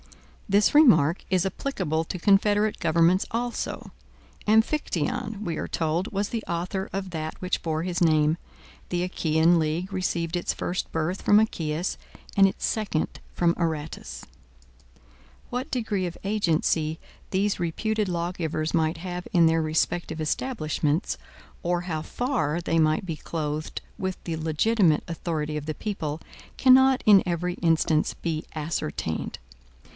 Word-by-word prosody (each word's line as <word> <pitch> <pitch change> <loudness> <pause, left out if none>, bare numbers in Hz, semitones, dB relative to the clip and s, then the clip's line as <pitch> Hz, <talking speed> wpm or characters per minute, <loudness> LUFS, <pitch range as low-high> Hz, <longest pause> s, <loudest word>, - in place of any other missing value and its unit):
This 205 +2 +4
remark 175 - +6
is 185 -1 +2
applicable 165 - -1
to 180 - -5
confederate 205 +3 +3
governments 170 +3 +3
also. 240 +1 -3 0.6
Amphictyon, 220 - +1
we 170 -2 -2
are - - -3
told, 165 +4 -1
was 200 +1 -1
the 230 -2 -3
author 180 +3 -3
of 195 -1 -4
that 155 -1 -5
which 185 0 -1
bore 160 -1 -1
his 180 -1 -2
name. 155 -2 +4 0.5
The 175 0 0
Achaean 165 -1 +3
league 165 +5 -1
received 175 -2 -1
its 175 - -1
first 180 - -3
birth 165 +4 -1
from 205 - +5
Achaeus, 170 -5 -1 0.4
and 195 -1 +7
its 190 - -3
second 210 -8 -2
from 170 -1 +2
Aratus. 150 - -3 1.3
What 255 +5 -3
degree 215 -6 -1
of 175 - -7
agency 165 -5 +1 0.3
these 200 +1 0
reputed 210 +5 -1
lawgivers 170 -2 -2
might 160 0 +1
have 180 +1 -5
in 170 -2 +5
their 165 0 +3
respective 160 +1 -1
establishments, 155 - -1 0.5
or 175 0 +1
how 165 -3 -3
far 195 - -1
they 165 -1 0
might 155 +3 +2
be 165 -3 -3
clothed 155 -1 -4 0.2
with 190 -1 -3
the 165 - -2
legitimate 160 +2 +2
authority 155 -3 -3
of 150 0 -4
the 155 - -2
people, 160 -7 -3 0.4
cannot 265 0 +6
in 205 -3 +7
every 175 0 -1
instance 160 -2 +1
be 160 -2 -3
ascertained. 155 - -3
170 Hz, 135 wpm, -26 LUFS, 160-195 Hz, 1.3 s, and